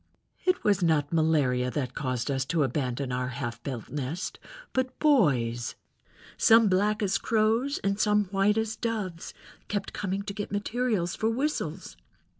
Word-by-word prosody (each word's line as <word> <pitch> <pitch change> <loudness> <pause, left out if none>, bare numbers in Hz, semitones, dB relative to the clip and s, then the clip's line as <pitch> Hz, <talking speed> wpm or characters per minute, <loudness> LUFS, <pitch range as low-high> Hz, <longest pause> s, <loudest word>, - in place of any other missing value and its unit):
"It 365 0 +2
was 200 -2 +3
not 160 -3 +2
malaria 145 -6 +2
that 130 -2 -3
caused 130 -2 -2
us 135 -1 0
to 160 +1 +1
abandon 130 -1 -2
our 125 0 -1
half 125 -2 -5
built 125 -6 -6
nest, 150 +4 -4 0.3
but 260 0 -1
boys, 130 - +2 0.6
some 225 0 +6
black 210 +3 +2
as 200 +2 +1
crows 230 +5 +1
and 200 +1 0
some 210 -1 +3
white 200 +2 +2
as 220 0 -1
doves, 205 -8 -4 0.3
kept 205 -1 -3
coming 195 0 -2
to 200 - -5
get 205 0 -5
materials 205 -3 -1
for 220 - 0
whistles. 275 +7 -2
190 Hz, 150 wpm, -28 LUFS, 135-215 Hz, 0.6 s, some